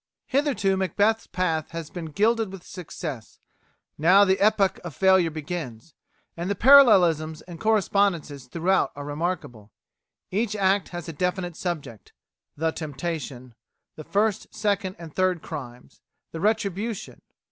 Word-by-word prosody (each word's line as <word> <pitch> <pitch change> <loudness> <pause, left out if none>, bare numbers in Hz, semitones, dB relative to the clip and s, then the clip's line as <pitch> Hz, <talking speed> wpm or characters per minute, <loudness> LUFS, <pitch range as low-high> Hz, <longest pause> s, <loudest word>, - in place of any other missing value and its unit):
Hitherto 255 -9 +1
Macbeth's 205 +4 +1
path 165 -4 -1
has 165 -2 -6
been 175 -2 -6
gilded 215 +6 +1
with 195 -2 -10
success; 155 - -7 0.6
now 185 +6 +6
the 190 0 +2
epoch 205 -2 +3
of 170 -6 -7
failure 190 -3 +4
begins. 155 -5 -6 0.4
And 175 +2 -4
the 200 - 0
parallelisms 180 - +6
and 175 -2 -10
correspondences 195 - +1
throughout 175 +8 +1
are 145 0 -7
remarkable. 145 - -4 0.6
Each 215 +2 -1
act 195 -1 +1
has 175 -3 -7
a 165 - -5
definite 180 +1 -2
subject: 160 - -6 0.4
The 160 +2 0
Temptation; 145 -5 -5 0.4
The 155 - -9
First, 205 +4 0
Second, 200 -3 -1
and 165 -3 -10
Third 185 -3 +1
Crimes; 125 -5 -9 0.3
The 165 - -6
Retribution. 210 +1 -2
180 Hz, 130 wpm, -25 LUFS, 155-200 Hz, 0.6 s, now